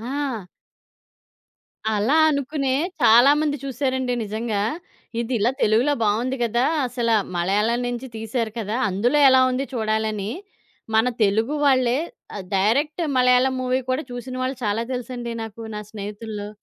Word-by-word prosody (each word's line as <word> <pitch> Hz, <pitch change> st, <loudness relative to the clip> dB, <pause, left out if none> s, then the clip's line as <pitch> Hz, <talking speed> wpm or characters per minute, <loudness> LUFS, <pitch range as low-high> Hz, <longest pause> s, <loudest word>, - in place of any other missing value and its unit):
ఆ! 255 Hz, -5 st, -3 dB, 1.5 s
అలా 225 Hz, +9 st, +2 dB
అనుకునే 280 Hz, -1 st, -1 dB, 0.3 s
చాలామంది 285 Hz, +6 st, +5 dB
చూసారండి 260 Hz, -1 st, -1 dB
నిజంగా. 215 Hz, 0 st, -2 dB, 0.6 s
ఇదిలా 235 Hz, -1 st, +1 dB
తెలుగులో 235 Hz, +7 st, +3 dB
బాగుంది 230 Hz, +5 st, +1 dB
గదా! 235 Hz, +2 st, +1 dB, 0.2 s
అసలు 235 Hz, -2 st, 0 dB, 0.2 s
మలయాళం 210 Hz, +7 st, +1 dB
నుంచి 245 Hz, +1 st, -4 dB
తీశారు 225 Hz, 0 st, -3 dB
కదా! 220 Hz, +1 st, -2 dB
అందులో 240 Hz, +10 st, +1 dB
ఎలా 260 Hz, 0 st, +6 dB
ఉంది 255 Hz, +2 st, -1 dB
చూడాలని 215 Hz, -2 st, -1 dB, 0.6 s
మన 220 Hz, +2 st, +4 dB, 0.2 s
తెలుగు 220 Hz, +7 st, +2 dB
వాళ్ళే 255 Hz, -2 st, +3 dB, 0.4 s
ఆహ్, 195 Hz, -, -6 dB
డైరెక్ట్ 285 Hz, -, +1 dB
మలయాళం 250 Hz, +1 st, +4 dB
మూవీ 255 Hz, +1 st, 0 dB
కూడా 265 Hz, +5 st, 0 dB
చూసినవాళ్ళు 255 Hz, +2 st, -4 dB
చాలా 210 Hz, +2 st, 0 dB
తెలుసండి 245 Hz, -1 st, -4 dB
నాకు 225 Hz, 0 st, -8 dB
నా 210 Hz, -, -4 dB
స్నేహితుల్లో. 210 Hz, 0 st, -6 dB
240 Hz, 120 wpm, -23 LUFS, 215-260 Hz, 1.5 s, ఎలా